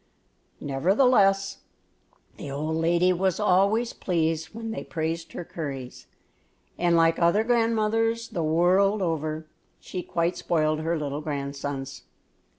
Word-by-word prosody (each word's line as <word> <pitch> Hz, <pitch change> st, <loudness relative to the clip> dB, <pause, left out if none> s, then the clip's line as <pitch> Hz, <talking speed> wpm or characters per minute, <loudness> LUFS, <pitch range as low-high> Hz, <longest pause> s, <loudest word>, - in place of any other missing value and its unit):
Nevertheless, 195 Hz, -, +2 dB, 0.8 s
the -, -, -7 dB
old 155 Hz, +3 st, -2 dB
lady 170 Hz, +2 st, +3 dB
was 185 Hz, +1 st, 0 dB
always 210 Hz, +4 st, +2 dB
pleased 160 Hz, -2 st, -1 dB
when 225 Hz, +2 st, -7 dB
they -, -, -5 dB
praised 165 Hz, 0 st, -4 dB
her 175 Hz, -, -6 dB
curries, 135 Hz, -7 st, -7 dB, 0.7 s
and, 175 Hz, -1 st, +2 dB
like 165 Hz, 0 st, +3 dB
other 170 Hz, +5 st, +3 dB
grandmothers 225 Hz, -1 st, +1 dB
the 170 Hz, -, -3 dB
world 185 Hz, +6 st, +3 dB
over, 155 Hz, -2 st, -2 dB, 0.3 s
she 180 Hz, -, -6 dB
quite 170 Hz, 0 st, -1 dB
spoiled 155 Hz, -2 st, 0 dB
her 165 Hz, +1 st, -1 dB
little 145 Hz, -1 st, -3 dB
grandsons. 140 Hz, -2 st, -5 dB
170 Hz, 120 wpm, -26 LUFS, 155-195 Hz, 0.8 s, lady